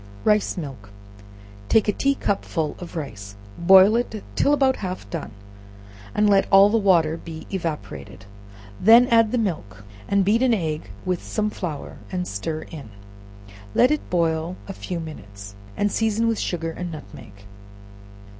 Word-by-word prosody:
Rice 210 -2 +2
Milk. 135 - -7 0.8
Take 220 - +4
a - - +4
tea 275 +6 +1
cupful 165 - -2
of 175 0 -9
rice, 105 -10 -7 0.2
boil 190 +4 +7
it 230 -3 -2
till 285 - +3
about 270 -2 +3
half 185 -1 -5
done, 165 -3 -4 0.9
and 210 0 +3
let 195 -1 +4
all 195 +1 +7
the 225 - +3
water 170 -6 +3
be 160 -1 -9
evaporated; 165 - -5 0.5
then 230 +5 +7
add 230 -2 +4
the 250 - 0
milk, 155 - -3 0.2
and 200 -1 +2
beat 220 +4 +3
an 255 -3 +4
egg 155 -5 -3 0.2
with 180 -2 -1
some 215 -1 -2
flour, 160 -8 -6
and 180 -1 -2
stir 155 +10 -4
in; 145 -9 -10 0.9
let 250 - +5
it 300 - -2
boil 165 0 0
n 195 - -5
few 180 -2 -5
minutes, 100 - -9 0.2
and 205 0 +1
season 225 +1 +1
with 225 -1 0
sugar 165 -2 -2
and 175 +1 -6
nutmeg. 110 -9 -11
180 Hz, 155 wpm, -23 LUFS, 155-210 Hz, 0.9 s, boil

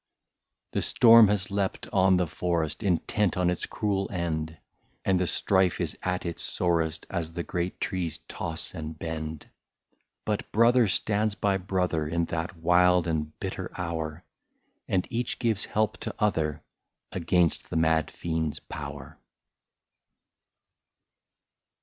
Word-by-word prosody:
The - - 0
storm 115 -2 +7
has 100 -2 0
leapt 100 -1 -1
on 95 -1 +5
the 90 - +2
forest, 85 -1 -2
Intent 100 0 +1
on 90 -1 +2
its 90 - -3
cruel 100 -2 -1
end, 80 -3 -2 0.5
And 95 -2 +3
the 90 - +1
strife 95 -1 +2
is - - -1
at 90 0 -2
its 85 -1 -4
sorest, 85 -3 +1
As 85 -1 -3
the 85 0 -3
great 90 +1 -3
trees 90 -4 -2
toss - - -3
and 80 0 -6
bend. 80 -1 -5 0.8
But 105 -1 -2
brother 115 +1 +5
stands 105 +2 +1
by 100 -2 +1
brother, 90 -5 -1
In 85 +2 0
that 85 +1 -3
wild 90 +1 +4
and 80 -2 -2
bitter - - -4
hour. 80 -1 -3 0.6
And 95 -2 +1
each 120 0 -2
gives 115 -5 0
help 110 0 0
to - - -5
other, 80 -8 0 0.5
Against 90 -2 +1
the - - -5
mad 80 -1 +2
fiend's 80 -2 -3
power. - - -8
90 Hz, 130 wpm, -27 LUFS, 80-100 Hz, 0.8 s, storm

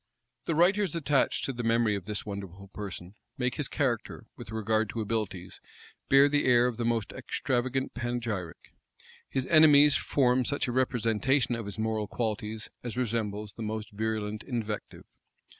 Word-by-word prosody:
The 165 - 0
writers 185 +1 +3
attached 145 -4 +1
to 135 - -2
the 120 - -4
memory 115 -1 +2
of 100 -3 -4
this 105 -1 -3
wonderful 100 -2 -7
person, 95 -2 -7 0.2
make 125 -2 0
his - - -2
character, - - -2
with - - -10
regard 110 0 0
to 115 - -4
abilities, 105 -4 -3 0.5
bear 135 +1 +7
the 145 0 +1
air 120 -1 +5
of 125 -2 -1
the 120 - -2
most 115 -3 0
extravagant 130 +1 -2
panegyric: 115 -8 -4 0.6
his 130 -1 -1
enemies 150 -3 +7
form 130 -2 +2
such 140 +3 0
a - - -1
representation 125 +1 +1
of 115 -2 -3
his 100 -1 -5
moral 110 -1 -1
qualities 110 0 -3
as 120 -1 -6
resembles 105 -4 -2
the 115 - -10
most 110 0 -4
virulent 110 0 -3
invective. 110 -5 -5
115 Hz, 160 wpm, -29 LUFS, 105-130 Hz, 0.6 s, bear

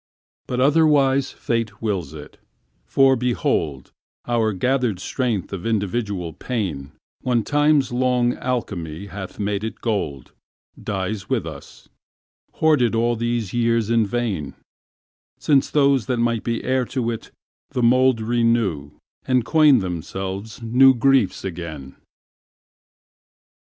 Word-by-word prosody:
But 125 - -2
otherwise 140 -2 +3
Fate 115 -2 -3
wills 95 -10 -2
it, 75 -1 -12 0.5
for, 135 -1 +4
behold, 85 - -1 0.4
Our 115 -2 +1
gathered 125 0 0
strength 115 -3 -2
of 95 -3 -5
individual 100 -5 -2
pain, 85 - -4 0.3
When 120 -3 +1
Time's 145 -1 +2
long 125 -1 +1
alchemy 100 -9 -4
hath 95 -2 -7
made 100 0 -1
it 110 - -5
gold, 75 - -3 0.5
Dies 100 +1 -4
with - - 0
us—hoarded 145 -8 -3
all 120 +1 +1
these 115 -3 -2
years 115 -2 +1
in 115 -2 +3
vain, 100 - -3 0.8
Since 140 -3 +2
those 140 -6 +2
that 125 - 0
might 115 -1 0
be 115 -1 -2
heir 130 -1 +1
to 120 -2 -2
it 115 - -7 0.4
the 125 - -2
mouldRenew, 115 - +2 0.3
and 125 -3 +2
coin 150 -3 +5
themselves 95 +4 -5
new 130 +3 +5
griefs 130 -5 +2
again. 80 -7 -7
115 Hz, 115 wpm, -22 LUFS, 95-125 Hz, 0.8 s, coin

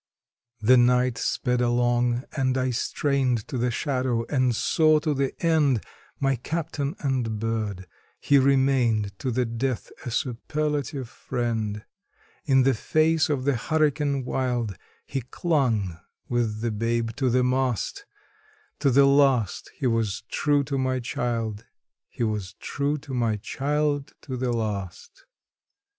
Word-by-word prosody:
The 125 +4 +6
night 125 -1 +3
sped 125 0 0
along, 120 0 +2
and 130 -2 +1
I 130 0 +1
strained 130 -2 0
to 145 - -6
the 125 +1 +1
shadow 125 -2 -1
and 130 -4 +2
saw 155 +5 +3
to 150 0 0
the 135 -1 0
end 150 -8 +3 0.4
My 135 -1 +1
captain 150 +1 -3
and 125 -6 -1
bird 110 -4 -2 0.3
he 140 -1 +4
remained 130 -6 +2
to 130 - -2
the 125 +1 +1
death 120 +2 -3
a - - -4
superlative 140 +2 -2
friend: 110 -3 -3 0.6
In 135 -2 +4
the 135 +1 +4
face 155 +7 +2
of 140 -4 0
the 140 +1 +2
hurricane 145 0 0
wild, 125 -6 -1 0.3
he 135 - -3
clung 115 - 0 0.3
with 115 -3 -1
the 115 0 0
babe 115 +1 -1
to 130 -3 +1
the 125 +1 +3
mast; 125 -2 -1 0.7
To 140 - +3
the 140 +2 +6
last 135 -6 +3
he 140 - -3
was 115 -3 0
true 145 -1 +2
to 135 0 -2
my 130 0 0
child 115 -3 -3 0.4
he - - -4
was 105 -4 -2
true 140 +7 -2
to 140 -1 -9
my 115 -3 +1
child 145 +6 -1
to 130 - -6
the 125 0 -1
last. 105 -6 -4
125 Hz, 140 wpm, -25 LUFS, 115-140 Hz, 0.7 s, The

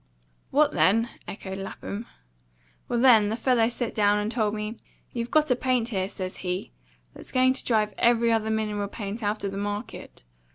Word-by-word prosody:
"What - - +3
then?" 225 +5 +3 0.2
echoed 190 -1 -6
Lapham. 200 +3 -6 0.8
"Well, 240 - 0
then, 230 -5 +6
the 220 - -1
fellow 235 -1 +2
set 240 0 -3
down 205 -1 +3
and 210 +1 -1
told 215 -3 0
me, 215 +2 -5 0.3
'You've 235 0 -3
got 305 -3 +3
a - - +5
paint 250 -2 0
here,' 190 -4 -1
says 185 -2 -6
he, 180 - -4 0.4
'that's - - -7
going 255 0 +4
to 265 - -1
drive 215 -3 +1
every 235 0 +4
other 220 -1 +1
mineral 210 -2 -1
paint 205 +2 -6
out 210 0 -1
of 200 - -1
the 195 - -4
market. 205 - -5
220 Hz, 180 wpm, -26 LUFS, 205-235 Hz, 0.8 s, then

